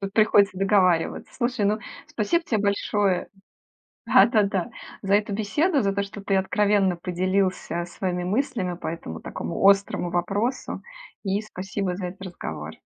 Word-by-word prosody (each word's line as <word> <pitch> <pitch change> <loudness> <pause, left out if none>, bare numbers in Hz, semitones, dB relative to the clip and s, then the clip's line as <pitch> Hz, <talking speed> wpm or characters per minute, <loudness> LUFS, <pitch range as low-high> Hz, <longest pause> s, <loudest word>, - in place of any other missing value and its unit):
Тут 195 -1 -4
приходится 205 -3 +4
договариваться. 190 -4 +2
Слушай, 240 -3 -1
ну, 210 +1 +1 0.3
спасибо 335 +11 0
те 220 - 0
большое 200 -2 +1 0.8
да, - - +7
да-да. 205 -3 +1 0.3
За 195 0 +2
эту 210 0 +2
беседу, 280 - +1
за 200 -1 +1
то, 200 +1 0
что 200 +1 -7
ты 195 - 0
откровенно 195 -1 +2
поделился 185 -1 -1
своими 180 0 -3
мыслями 205 -3 -1
по - - -5
этому, 80 - -6
такому 85 - -4
острому 195 -3 +2
вопросу. 200 +9 -1 0.4
И 195 0 0
спасибо 195 -2 -4
за 185 -1 -4
этот 185 +2 -9
разговор. 185 -2 -6
195 Hz, 145 wpm, -25 LUFS, 185-210 Hz, 0.8 s, да